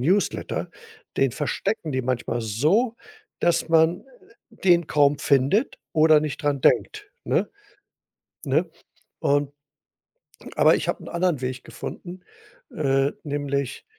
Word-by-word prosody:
Newsletter, 195 +4 0 0.5
den 135 -1 +3
verstecken 165 - -3
die 130 - 0
manchmal 125 -1 -2
so, 155 - +1 0.4
dass 175 -1 +1
man 165 +1 +3 0.5
den 175 -7 +2
kaum 145 -1 +3
findet 140 - +1
oder 155 -1 +5
nicht 155 +1 -4
dran 145 -2 0
denkt, 415 -1 +1
ne? - - 0 1.0
Ne? - - +1 0.5
Und 145 0 +1 1.0
aber - - +5
ich - - -3
habe - - -2
'nen - - -9
anderen 170 -5 0
Weg 130 0 -4
gefunden, 180 +1 -8 0.5
äh, 135 -2 +1
nämlich, 140 -2 -3
150 Hz, 115 wpm, -24 LUFS, 135-175 Hz, 1.0 s, oder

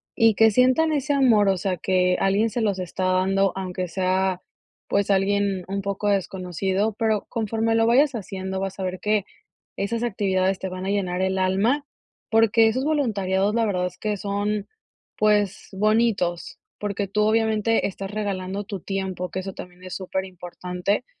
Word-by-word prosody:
y 225 -2 +5
que 225 +1 +6
sientan 255 +8 +3
ese 290 0 0
amor, 230 -8 +4
o 190 - +3
sea, 185 0 -1
que 180 +1 +2
alguien 200 +4 +2
se 235 - -2
los 200 -4 0
está 185 +1 -3
dando, 190 +1 +2
aunque 185 -1 -3
sea, 185 +1 0 0.5
pues, 200 0 +1
alguien 195 -1 +1
un 200 +1 -2
poco 200 +1 -2
desconocido, 190 +1 -1
pero 220 -3 +1
conforme 225 0 0
lo 225 0 +3
vayas 270 +4 +4
haciendo, 190 -2 -4
vas 195 0 -4
a - - -2
ver 185 0 -3
que 210 -1 +1 0.5
esas 230 +4 -2
actividades 195 -4 0
te 190 - -3
van 185 +1 -6
a - - -2
llenar 185 -3 -1
el 190 0 0
alma, 205 +10 +1 0.5
porque, 225 0 +5
esos 255 +5 0
voluntariados, 205 -9 +1
la 230 -1 +2
verdad 180 -3 0
es 180 - -11
que 210 -1 -2
son, 205 +1 -2 0.5
pues, 210 -2 +1
bonitos, 210 -4 +1 0.2
porque, 205 -1 -2
tú 210 +2 +1
obviamente 220 0 +2
estás 195 0 -6
regalando 200 -2 -3
tu 200 -2 -5
tiempo, 190 -2 -3
que 185 - -3
eso 190 0 -6
también 180 0 -11
es 185 - -6
súper 190 0 -3
importante. 180 +4 -3
195 Hz, 170 wpm, -24 LUFS, 185-220 Hz, 0.5 s, que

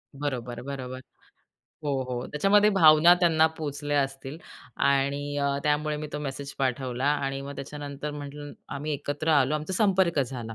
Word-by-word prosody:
बरोबर, 125 -4 -4
बरोबर, 130 -1 -6 0.9
हो, 145 - 0 0.2
हो, 125 0 -3
त्याच्यामध्ये 205 +7 +3
भावना 165 -2 +7
त्यांना 165 -3 +4
पोहोचल्या 145 -1 -1
असतील 135 +1 -6 0.4
आणि 140 +1 +1
अ, 140 0 0
त्यामुळे 150 0 0
मी 150 0 -5
तो 150 - -3
मेसेज 140 -1 -5
पाठवला 130 -1 -1
आणि 135 -2 0
मग 140 - -6
त्याच्यानंतर 145 +1 -6
म्हटलं 145 0 -8 0.2
आम्ही 150 +2 -3
एकत्र 145 +2 -3
आलो 145 -1 +3
आमचा 155 +4 -3
संपर्क 190 -5 +2
झाला 120 -4 -4
145 Hz, 150 wpm, -27 LUFS, 135-150 Hz, 0.9 s, भावना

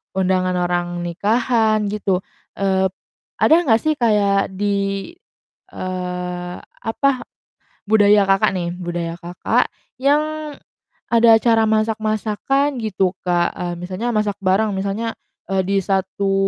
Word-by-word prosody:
undangan 185 -1 +1
orang 175 0 0 0.2
nikahan 215 +4 +1
gitu, 195 -3 0 0.4
eee, 190 -1 +2 0.5
ada 315 - +6
nggak 225 -4 +4
sih 310 - +1
kayak 205 -4 +2
di, 200 - -1 0.6
eee, 180 -1 -4
apa, 275 +5 -1 0.8
budaya 205 -1 +5
Kakak 195 0 +3
nih, 175 -2 -2
budaya 175 -2 -4
Kakak, 175 +1 0 0.3
yang 305 +2 +1 0.6
ada 230 -1 +6
cara 225 -2 +3
masak-masakan 220 +5 0
gitu, 195 -3 0 0.2
Kak? 175 -1 +2
E - - -5 0.2
misalnya 185 +7 -3
masak 210 -1 0
bareng 195 +3 +2
misalnya, 200 +4 -2 0.4
e 190 0 +2
di 195 0 +2
satu 195 +1 0
200 Hz, 115 wpm, -20 LUFS, 185-225 Hz, 0.8 s, ada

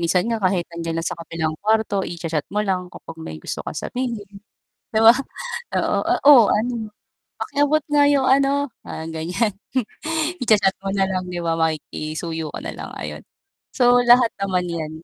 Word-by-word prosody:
Minsan 175 +4 +1
nga 225 -2 -1
kahit 185 -2 +1
nandiyan 165 -1 -3
na 165 - -2
sa - - -2
kabilang 160 -1 -3
kuwarto, 215 -2 +1
i-cha-chat 165 -3 -3
mo 210 - -2
lang 180 -2 -1
kapag 165 - -10
may 80 - -7
gusto - - -5
kang - - -6
sabihin. 235 -5 -4 0.7
'Di 220 - +3
ba? 225 - +11 0.7
oo, - - +1
oo, - - +1
"Oh 275 -5 +10
ano, 225 -1 -1 0.5
pakiabot 290 +2 +1
nga 290 -1 +4
yung 275 -2 +3
ano" 275 +1 +3 0.2
parang 160 - -6
ganyan, 180 +7 -1 0.9
i-cha-chat 210 -5 +3
mo 195 - -2
na 195 - +2
lang, 185 -1 -2
'di 180 -1 -4
ba, 165 -1 0
makikisuyo 160 0 -3
ka - - -5
na - - -4
lang, - - -7
ayon. - - -6 0.5
So, 245 -1 +5
lahat 240 -1 +6
naman 185 -2 0
yan. 160 -1 -5
195 Hz, 170 wpm, -22 LUFS, 165-240 Hz, 0.9 s, ba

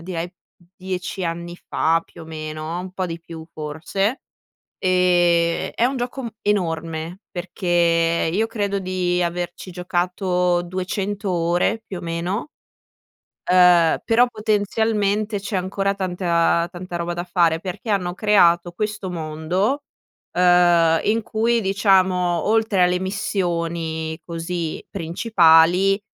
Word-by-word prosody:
direi 175 0 -5 0.4
10 185 0 -4
anni 170 +1 -4
fa, 165 -1 0
più - - -14
o - - -9
meno, 155 +1 -5
un 185 0 -7
po' 185 0 -3
di 165 -1 -5
più 165 -1 -10
forse. 160 - -2 0.6
Ehm, 175 -2 +2
è 235 - +1
un 265 - -2
gioco 250 +2 -4
m 235 - -4
enorme, 165 -3 -2
perché 170 -2 +1
io 215 +5 +1
credo 205 -3 -2
di 180 -1 -1
averci 175 +2 -4
giocato 180 0 0
200 190 +3 -3
ore 175 +6 0
più 190 -4 -7
o - - -8
meno, 175 - -3 1.0
uhm, 180 -2 +5
però 235 +2 +4
potenzialmente 215 -1 0
c'è 200 0 -3
ancora 195 +2 -1
tanta- 175 -3 +1
tanta 175 0 -7
roba 170 0 -3
da 175 +1 -4
fare, 170 -3 +2
perché 185 +5 -6
hanno 180 -3 0
creato 175 -4 +3
questo 210 -1 -3
mondo, 170 - -1 0.5
ehm, 175 -2 +4
in 225 +1 +1
cui 230 +2 +1
diciamo 190 -3 +2
oltre 220 -3 +2
alle 180 0 +1
missioni 170 -4 -2
così 165 -1 -4
principali, 175 +1 +3
180 Hz, 120 wpm, -21 LUFS, 170-195 Hz, 1.0 s, uhm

